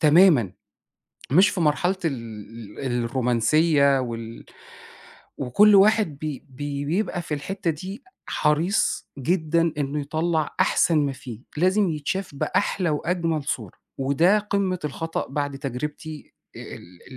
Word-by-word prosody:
تمامًا، 155 Hz, -, +5 dB, 0.8 s
مش 185 Hz, +9 st, +6 dB
في 185 Hz, -, -3 dB
مرحلة 170 Hz, +4 st, +2 dB
ال 165 Hz, -, +1 dB, 0.7 s
ال 120 Hz, -3 st, -1 dB
الرومانسية 135 Hz, +4 st, +3 dB
وال 115 Hz, -2 st, -6 dB, 0.9 s
وكُلّ 200 Hz, +12 st, +5 dB
واحد 200 Hz, -6 st, +4 dB
بي 150 Hz, -3 st, -5 dB
بي 140 Hz, +2 st, -5 dB
بيبقى 175 Hz, +3 st, -1 dB
في 155 Hz, -, -3 dB
الحتة 170 Hz, +4 st, -2 dB
دي 190 Hz, -, -7 dB, 0.2 s
حريص 160 Hz, +7 st, +1 dB
جدًا 165 Hz, +2 st, +1 dB
إنه 145 Hz, +1 st, -1 dB
يطلّع 155 Hz, +1 st, -1 dB
أحسن 165 Hz, -2 st, +3 dB
ما 145 Hz, -2 st, +1 dB
فيه، 120 Hz, -4 st, -9 dB, 0.2 s
لازم 185 Hz, +4 st, +3 dB
يتشاف 160 Hz, +3 st, -3 dB
بأحلى 175 Hz, +5 st, 0 dB
وأجمل 165 Hz, 0 st, -1 dB
صورة 110 Hz, -9 st, -3 dB, 0.3 s
وده 140 Hz, +9 st, +3 dB
قمة 200 Hz, -3 st, -1 dB
الخطأ 165 Hz, +3 st, -3 dB
بعد 145 Hz, -2 st, -3 dB
تجربتي 150 Hz, +3 st, -6 dB, 0.2 s
آآ -, -, -8 dB, 0.2 s
ال 85 Hz, +1 st, -16 dB
150 Hz, 120 wpm, -24 LUFS, 140-180 Hz, 0.9 s, مش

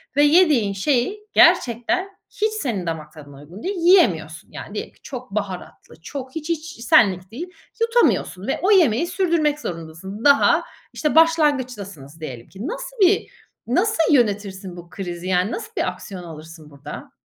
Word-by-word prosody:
ve 290 Hz, -, +5 dB
yediğin 295 Hz, -, +4 dB
şey 250 Hz, -, 0 dB
gerçekten 315 Hz, -, +3 dB
hiç 440 Hz, -3 st, -1 dB
senin 220 Hz, -, -2 dB
damak 155 Hz, -2 st, -5 dB
tadına 145 Hz, -3 st, -13 dB
uygun 170 Hz, +8 st, -12 dB
değil, 390 Hz, +3 st, -2 dB
yiyemiyorsun. 195 Hz, -, +3 dB
Yani -, -, -9 dB
diyelim -, -, -5 dB
ki -, -, -30 dB
çok 255 Hz, -5 st, -8 dB
baharatlı, 195 Hz, -5 st, -6 dB
çok 260 Hz, -, -8 dB
hiç, 320 Hz, 0 st, -5 dB
hiç, 320 Hz, -6 st, -4 dB
senlik 190 Hz, -5 st, +4 dB
değil, 325 Hz, +10 st, -6 dB, 0.3 s
yutamıyorsun 465 Hz, +1 st, +1 dB
ve -, -, -1 dB
o 390 Hz, -, +3 dB
yemeği 335 Hz, -, +4 dB
sürdürmek 335 Hz, -5 st, +1 dB
zorundasın. 175 Hz, -, -7 dB
Daha, 280 Hz, -1 st, +5 dB, 0.3 s
işte, 300 Hz, -1 st, -1 dB
başlangıçtasınız 250 Hz, -, +1 dB
diyelim 125 Hz, -6 st, -8 dB
ki. 200 Hz, +7 st, -7 dB
Nasıl -, -, -6 dB
bir 390 Hz, +1 st, +3 dB, 0.4 s
nasıl 340 Hz, -, +2 dB
yönetirsin 200 Hz, -6 st, 0 dB
bu 175 Hz, 0 st, -11 dB
krizi? 175 Hz, -1 st, -6 dB
Yani 185 Hz, +3 st, +1 dB
nasıl 445 Hz, 0 st, -6 dB
bir -, -, +1 dB
aksiyon 185 Hz, 0 st, -9 dB
alırsın 160 Hz, -1 st, -11 dB
burada? 140 Hz, -1 st, -10 dB
235 Hz, 155 wpm, -22 LUFS, -, 0.4 s, ve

